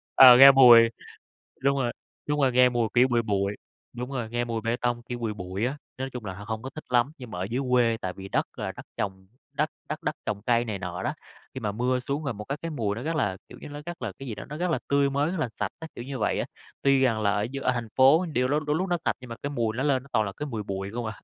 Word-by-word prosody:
Ờ, 125 -2 +10
nghe 135 +1 +11
mùi 120 -4 +8 0.7
đúng 140 +1 +2
rồi, 120 -3 -1 0.3
đúng 150 0 0
rồi, 130 -2 +3
nghe 125 0 +5
mùi 120 -2 0
kiểu 125 +1 +5
bụi 120 -2 +2
bụi 100 -2 -1 0.4
đúng 125 +2 -6
rồi, 120 -5 -3
nghe 120 +1 -1
mùi 115 -1 -3
bê 115 +2 0
tông, 120 -1 -1
kiểu, 120 0 -6
bụi 115 -2 -2
bụi 95 +2 -3
á, 135 +4 -2 0.2
nói 130 +1 -3
chung 125 -3 -6
là 95 - -4
h 95 - -12
hông 110 0 -3
có 130 - -6
thích 155 +3 -10
lắm. 125 +2 +2
Nhưng 125 -4 -10
mà 90 - -5
ở 90 - -1
dưới 120 +7 -2
quê 120 -2 +3
tại 90 0 -3
vì 95 +1 -9
đất - - +1
là - - -3
đất - - -11
trồng, 95 -1 -4 0.3
đất 150 +2 0 0.2
đất - - -5
đất - - -1
trồng 100 - -3
cây 120 +2 +2
này 105 -4 -4
nọ 90 +1 -5
đó, - - -1 0.4
khi 130 - -5
mà 105 -3 -2
mưa 125 +4 0
xuống 145 +3 -2
rồi 140 - -2
một 105 0 -7
cái 140 +2 -3
cái 165 -1 -4
mùi 105 -8 -1
nó 120 - -6
rất 160 +2 -2
là, 100 -10 0
kiểu - - -11
như, - - -8
nó 145 0 -7
rất 175 0 -7
là - - -3
cái 135 - -10
gì 115 - -4
đó, - - -8
nó 150 - -6
rất 180 0 -1
là - - +1
tươi 140 0 +3
mới, 145 +4 0
rất 185 - -3
là 130 - -1
sạch 105 -3 -1
á, 160 - -7
kiểu 120 - -6
như 135 0 -6
vậy 105 - 0
á. - - -1 0.4
Tuy 135 -1 +4
rằng 115 -4 +2
là 100 -1 +2
ở 105 +1 0
d 140 - -3
ở 130 - +2
thành 120 -2 -3
phố 140 +7 +6
điều 125 -1 +2
lôi 145 +3 +1
đôi 150 - +2
lúc 185 +4 -1
nó 175 - +2
sạch - - +1
nhưng 125 -2 -11
mà 115 - -5
cái 140 - -2
mùi 115 -6 -1
nó 135 - 0
lên 135 -3 +1
nó 140 - -18
toàn 110 - +2
là 100 - -4
cái 150 - -3
mùi 115 -6 -4
bụi 95 0 -4
không 120 -1 -3
à. 110 -2 -6
125 Hz, 310 wpm, -26 LUFS, 110-140 Hz, 0.7 s, nghe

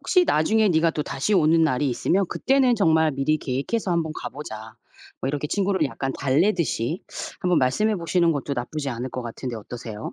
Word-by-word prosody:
혹시 365 -1 +3
나중에 215 +8 +3
네가 165 -1 +3
또다시 150 +5 -2
오는 165 -1 +4
날이 135 0 +1
있으면 190 +10 +1
그때는 265 -2 +2
정말 160 -5 +3
미리 140 +3 0
계획해서 145 - -2
한번 160 -2 0
가 - - -5
보자." 110 -6 -8 0.5
뭐 135 - -2
이렇게 145 +1 -2
친구를 195 -4 +1
약간 135 0 -4
달래듯이 155 - +1 0.4
한번 180 -2 +2
말씀해 205 +12 +1
보시는 170 0 +2
것도 140 -1 -3
나쁘지 140 +4 -4
않을 125 +2 -4
것 130 0 -5
같은데 120 +1 -6
어떠세요? 110 0 -7
155 Hz, 410 characters per minute, -24 LUFS, 130-180 Hz, 0.5 s, 오는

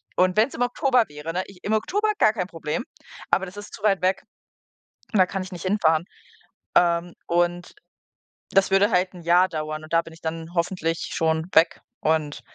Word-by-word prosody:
und 185 +2 +2
wenn 220 +4 +5
es - - -15
im - - -5
Oktober 245 -1 +2
wäre, 150 +3 -7
ne? 185 +1 -1
Ich 195 -2 -15
im 215 - -1
Oktober 415 - +1
gar 215 - +5
kein 185 -5 -3
Problem, 165 +7 -4 0.5
aber 190 - +3
das 190 +2 -11
ist 205 - -9
zu 205 - -11
weit 195 -3 +3
weg 190 +1 +1 0.9
und 205 - +3
da 185 - +7
kann 190 +1 -4
ich 190 - -10
nicht 175 - -7
hinfahren, 170 -5 +2 0.7
ähm, 170 0 +3
und 175 +1 0 0.8
das 195 0 +3
würde 200 +3 +4
halt 180 +1 +2
'n 175 - -10
Jahr 175 +2 +4
dauern 155 0 -4
und 155 - -12
da 165 0 +4
bin 165 - -13
ich 165 - -15
dann 165 +1 -5
hoffentlich 170 -1 -1
schon 160 0 +1
weg 165 +1 +4 0.2
und 155 -2 0
180 Hz, 200 wpm, -24 LUFS, 165-195 Hz, 0.9 s, da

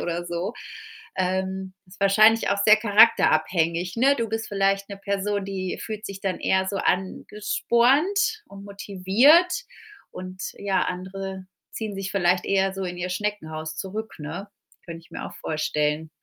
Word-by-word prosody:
oder 175 0 -3
so. 175 +5 -3 0.6
Ähm, 190 0 -2
ist 185 +2 -17
wahrscheinlich 215 +3 +5
auch 200 - +1
sehr 215 - +8
charakterabhängig, 180 -5 +3
ne? 275 +4 +4
Du 230 -2 -2
bist 225 0 -3
vielleicht 195 0 +1
'ne 200 - -7
Person, 200 0 -2
die 190 -2 -4
fühlt 215 -1 -6
sich 195 -1 -8
dann 190 -2 -2
eher 190 0 +1
so 200 - -3
angespornt 245 - +1
und 200 0 -11
motiviert 205 - +3 0.6
und 185 0 -8 0.2
ja, 200 -1 0
andere 190 +1 -5 0.3
ziehen 215 -3 -5
sich 195 0 -4
vielleicht 180 -2 +2
eher 195 -1 +1
so 195 - -4
in 180 -1 -5
ihr 180 +1 -3
Schneckenhaus 160 -6 -4
zurück, 210 +6 -5
ne? 165 +7 -6 0.4
Könnte 165 -1 -8
ich - - -23
mir - - -6
auch - - -10
vorstellen. 155 0 -1
195 Hz, 150 wpm, -24 LUFS, 180-210 Hz, 0.6 s, sehr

